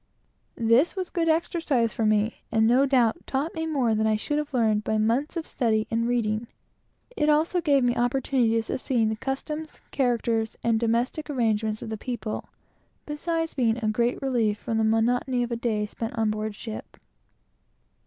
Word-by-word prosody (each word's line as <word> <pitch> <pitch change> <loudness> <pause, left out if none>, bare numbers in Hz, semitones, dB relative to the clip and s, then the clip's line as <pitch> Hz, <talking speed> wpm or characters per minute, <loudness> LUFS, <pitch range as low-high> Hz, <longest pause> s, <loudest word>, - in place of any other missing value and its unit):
This 230 - +3
was 370 -2 -3
a - - -33
good 330 -2 0
exercise 315 -8 +1
for 225 - 0
me, 215 +1 +1
and 220 -1 +3
no 255 +5 +4
doubt 245 -5 +2
taught 280 +5 -1
me 320 0 -3
more 265 -8 +1
than 220 0 +1
I 215 - +3
should 295 +7 -1
have 300 0 -4
learned 220 -4 +2
by 220 - 0
months 240 +10 0
of 325 - -3
study 220 -4 0
and 230 +1 +1
reading; 230 -2 0 0.7
it 300 0 +1
also 320 +4 +2
gave 285 -5 +3
me 245 0 +2
opportunities 240 -2 +1
of - - -2
seeing 230 -4 +1
the 220 - -1
customs, 300 +6 -5
characters, 235 -4 0
and 230 -1 +2
domestic 235 +7 0
arrangements 220 -5 0
of - - -6
the 220 - -3
people; 235 -1 -5 0.6
beside 325 +2 -2
being 230 -3 +2
a - - +2
great 235 +3 +1
relief 230 -6 +1
from 225 +1 -2
the - - +2
monotony 245 +3 +2
of 240 - -4
a - - 0
day 220 -3 -1
spent 225 +2 -5
on 220 -1 +2
board 215 0 -3
ship. 220 +1 -8
235 Hz, 185 wpm, -26 LUFS, 220-275 Hz, 0.7 s, no